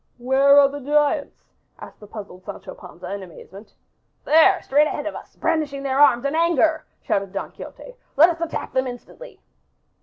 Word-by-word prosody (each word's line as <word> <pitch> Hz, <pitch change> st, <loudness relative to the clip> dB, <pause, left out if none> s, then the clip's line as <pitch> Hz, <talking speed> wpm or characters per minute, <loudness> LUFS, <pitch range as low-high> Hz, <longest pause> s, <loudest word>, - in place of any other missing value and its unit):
"Where 265 Hz, +3 st, +4 dB
are 280 Hz, -, +6 dB
the 285 Hz, +1 st, -7 dB
giants?" 295 Hz, +1 st, 0 dB, 0.3 s
asked -, -, -13 dB
the 210 Hz, -, -13 dB
puzzled 200 Hz, -3 st, -10 dB
Sancho -, -, -9 dB
Panza 180 Hz, +1 st, -10 dB
in 200 Hz, -, -5 dB
amazement. 190 Hz, +3 st, -13 dB, 0.5 s
"There, 325 Hz, +5 st, +5 dB
straight 295 Hz, +3 st, +3 dB
ahead 295 Hz, -, -4 dB
of 310 Hz, -, -4 dB
us, -, -, -12 dB
brandishing 285 Hz, -3 st, -2 dB
their 270 Hz, 0 st, -1 dB
arms 270 Hz, -3 st, +5 dB
in 280 Hz, -, -1 dB
anger," 325 Hz, -1 st, +1 dB, 0.2 s
shouted 195 Hz, -1 st, -2 dB
Don 195 Hz, -, -5 dB
Quixote. -, -, -11 dB, 0.2 s
"Let 325 Hz, +5 st, +7 dB
us 335 Hz, -1 st, -4 dB
attack 335 Hz, -, -4 dB
them 260 Hz, 0 st, 0 dB
instantly." 250 Hz, -, -11 dB
280 Hz, 175 wpm, -22 LUFS, 230-310 Hz, 0.5 s, Let